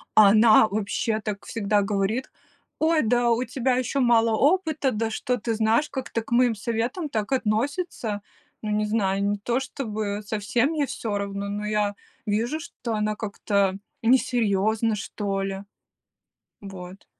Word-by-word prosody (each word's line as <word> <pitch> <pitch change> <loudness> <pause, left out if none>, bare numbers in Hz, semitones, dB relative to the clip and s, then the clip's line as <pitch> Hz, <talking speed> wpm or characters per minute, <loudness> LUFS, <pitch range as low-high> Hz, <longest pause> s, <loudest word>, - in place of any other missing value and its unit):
А 210 -2 +8
она, 215 +1 +6
вообще, 215 +2 -1
так 210 -2 -5
всегда 210 -2 +1
говорит: 200 +5 -1 0.5
"Ой, 320 0 +3
да 240 +1 +2
у 230 +2 +2
тебя 255 +1 0
еще 255 +2 -1
мало 230 -3 +4
опыта, 310 - +2
да 220 +1 -1
что 250 +3 -1
ты 230 +1 -2
знаешь". 225 +7 +2
Как-то 255 -3 -3
к 220 - -14
моим 240 -1 +4
советам 235 - -2
так 215 -3 -2
относится. 235 - -1 0.4
Ну, 215 - -3
не 210 0 +1
знаю, 200 -2 0
не 205 +1 0
то 235 +5 -1
чтобы 215 -6 -4
совсем 220 +5 0
мне 305 -3 0
всё 220 -5 -3
равно, 200 0 -4
но 205 +1 -3
я 210 -1 0 0.3
вижу, 230 +8 0
что 240 -6 -6
она 215 0 0
как-то 200 -2 0 0.2
несерьезна, 225 -3 +2
что 200 -1 -3
ли. 195 0 -4 1.0
Вот. 190 -1 -10
220 Hz, 150 wpm, -25 LUFS, 205-245 Hz, 1.0 s, А